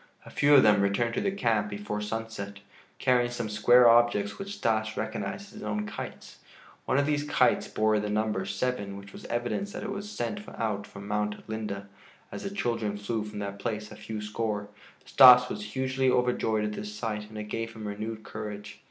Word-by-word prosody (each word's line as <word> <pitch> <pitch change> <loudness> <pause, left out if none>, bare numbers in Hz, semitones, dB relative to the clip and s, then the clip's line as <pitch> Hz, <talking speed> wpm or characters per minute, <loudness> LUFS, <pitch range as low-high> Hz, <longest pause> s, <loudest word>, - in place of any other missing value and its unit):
A - - -11
few 145 +1 +5
of 135 - +8
them 105 -1 +5
returned 110 +4 +1
to - - -1
the - - +1
camp 115 - +1
before 105 0 -4
sunset, 105 -2 -5 0.4
carrying 125 -2 +3
some 120 -2 -3
square 120 +4 +6
objects 115 -4 +4
which 200 +1 -5
Stas 110 - 0
recognized 110 - -4
as - - -17
his - - -11
own 105 0 -2
kites. 105 - -8 0.5
One - - +1
of 140 - +3
these 145 0 +1
kites 150 - +2
bore 110 0 +2
the 105 0 -3
number 105 -2 0
7, 100 -1 -2
which 100 0 -11
was - - -10
evidence 120 - -2
that - - -5
it 215 - -4
was 200 +1 -5
sent 205 -1 -3 0.2
out 105 -3 -2
from 100 0 -10
Mount 105 0 -2
Linde, 105 -3 -4 0.5
as - - -6
the 195 - -3
children 115 - -2
flew 105 +2 -2
from 105 -1 -8
that 100 0 -5
place 105 +1 -4
a - - -9
few 110 0 -6
score. 105 -1 -3 0.4
Stas 125 -2 +8
was 105 - -4
hugely 130 +4 0
overjoyed 120 -4 +1
at 105 - -2
this 105 0 -5
sight 105 -1 -4
and 110 - -10
it 105 - -3
gave 115 +2 -4
him 110 -2 -7
renewed 110 +2 -5
courage. 105 -1 -7
110 Hz, 200 wpm, -28 LUFS, 105-120 Hz, 0.5 s, of